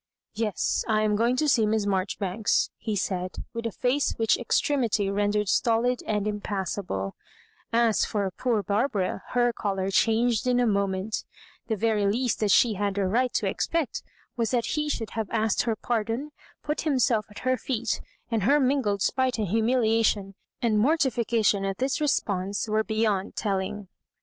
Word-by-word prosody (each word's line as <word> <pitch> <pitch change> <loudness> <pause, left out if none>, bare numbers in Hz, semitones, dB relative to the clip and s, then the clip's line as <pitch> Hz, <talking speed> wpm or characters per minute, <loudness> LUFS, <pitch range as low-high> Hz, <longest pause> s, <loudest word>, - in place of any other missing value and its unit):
'* - - -61
Yes,. 210 - 0
I 215 -1 +2
am 210 -1 +2
going 235 +4 +2
to 300 +4 +1
see 230 -6 +3
Miss 215 -1 +1
Marjori 190 -1 -1
banks," 200 +2 0
he 215 -2 -2
said, 185 -2 -2 0.2
with 230 0 -3
a - - -1
fiMse 250 +6 0
which 225 -1 +3
extremity 235 -5 +1
ren 205 +1 +1
dered 210 0 0
stolid 235 +4 +2
and 210 -2 0
impassibla 195 - -3 0.6
As 230 -2 +3
for 200 -3 -1
poor 225 +1 0
Barbara, 205 -3 0
her 240 -1 +3
colour 195 -3 -2
changed 230 +3 +2
in 245 0 +3
a 245 - +3
moment 200 -1 -1 0.4
The 220 - 0
very 215 -1 +1
least 240 +4 0
that 210 - +1
she 225 +3 +5
had 200 0 -2
a 200 - +1
right 245 +7 +1
to - - 0
expect 330 -4 -1 0.3
was 230 -3 0
that 240 -3 +1
he 300 -1 -1
should 225 -6 -3
have 220 -3 -3
asked 220 -2 +1
her 230 -2 0
pardon, 230 +6 -2 0.3
put 300 - -2
himself 255 -7 +1
at 205 - -14
her 255 0 +3
feet; 235 -2 -2 0.3
and 225 -2 +1
her 280 +10 +4
mingled 255 -8 +1
spite 260 -1 +1
and 210 -4 -1
humiliation 225 -2 +2 0.3
and 220 -3 +3
morti 275 +3 +3
fication 225 -3 +1
at 195 -1 -2
this 265 +3 -1
response 200 -9 0
were 215 0 +1
beyond 215 -3 -1
telling. 200 0 -2
220 Hz, 175 wpm, -26 LUFS, 200-245 Hz, 0.6 s, she